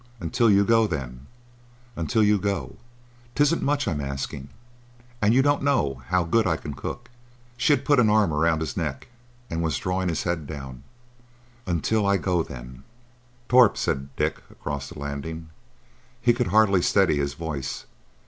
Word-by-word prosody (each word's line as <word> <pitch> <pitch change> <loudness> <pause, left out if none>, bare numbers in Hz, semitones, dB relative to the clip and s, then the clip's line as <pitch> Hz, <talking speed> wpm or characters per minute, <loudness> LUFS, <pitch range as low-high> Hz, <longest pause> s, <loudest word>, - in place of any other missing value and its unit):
Until 110 +6 +1
you 100 -1 +5
go, 115 0 +4
then. 65 -5 -6 0.7
Until 110 +7 +1
you 105 0 +3
go. 100 -1 -3 0.6
'Tisn't 145 +3 +2
much 145 -2 0
I'm 75 -7 -1
asking, 70 0 -5 0.7
and—you 115 +6 +4
don't 145 0 +2
know 75 - 0
how 90 +3 +2
good 110 +6 +2
I 80 -3 +1
can 75 -2 -7
cook." 120 - -7 0.4
She 120 +3 +2
had 140 -1 -1
put 145 -1 +4
an 115 -3 +4
arm 105 -6 +3
round 80 +1 +2
his 80 -4 -3
neck 75 - -4 0.4
and 80 0 -3
was 80 -5 0
drawing 90 +2 -1
his 85 - -2
head 85 -5 -2
down. 65 -4 -8 0.9
"Until—I—go, 95 0 +1
then." 65 -2 -9 0.6
"Torp," 125 -4 +5
said 70 0 -2
Dick, - - -1
across 70 -1 -6
the 85 - -11
landing. 75 +3 -6 0.7
He 120 0 +3
could 125 0 -1
hardly 100 -3 +4
steady 95 -4 +3
his 70 0 -2
voice. 75 -5 -5
85 Hz, 155 wpm, -25 LUFS, 70-110 Hz, 0.9 s, you